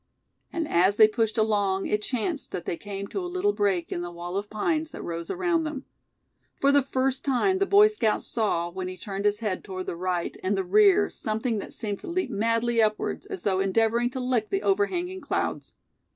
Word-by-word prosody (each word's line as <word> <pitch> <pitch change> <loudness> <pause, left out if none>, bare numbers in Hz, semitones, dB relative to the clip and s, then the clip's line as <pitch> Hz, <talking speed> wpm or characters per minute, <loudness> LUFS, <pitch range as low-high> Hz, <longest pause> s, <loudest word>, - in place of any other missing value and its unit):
And 330 -3 -2
as 185 +4 +3
they 215 0 +8
pushed 220 0 -1
along 205 -3 +1
it 210 - 0
chanced 270 +7 -3
that 175 - -4
they - - -2
came 200 +3 -6
to - - -3
a 355 - -4
little 370 +3 +1
break 195 - 0
in 175 - -2
the 175 - -4
wall 175 +1 -6
of 205 +1 -3
pines 310 +9 -1
that - - -8
rose 170 0 -5
around 350 -3 +1
them. 300 -3 -5 0.7
For 280 - +4
the 285 0 +5
first 265 0 -1
time 290 +9 +2
the 395 - +2
Boy 410 +1 +7
Scout 415 - 0
saw, 175 -7 -1
when 185 +1 -4
he 185 0 -6
turned 195 +1 -5
his 210 +1 +1
head 205 -5 -2
toward 185 -2 -6
the - - -4
right, 180 0 -2
and 195 +2 0
the 195 - 0
rear, 205 +2 +4
something 220 +1 -2
that - - -8
seemed 205 -4 -3
to - - -10
leap 340 -6 -1
madly 230 +2 +1
upwards, 215 - -1
as 390 -3 -6
though 190 -2 +1
endeavoring 225 +5 +2
to 260 - -5
lick 250 -4 0
the 390 - -1
overhanging 375 -2 0
clouds. - - -3
220 Hz, 210 wpm, -26 LUFS, 195-285 Hz, 0.7 s, they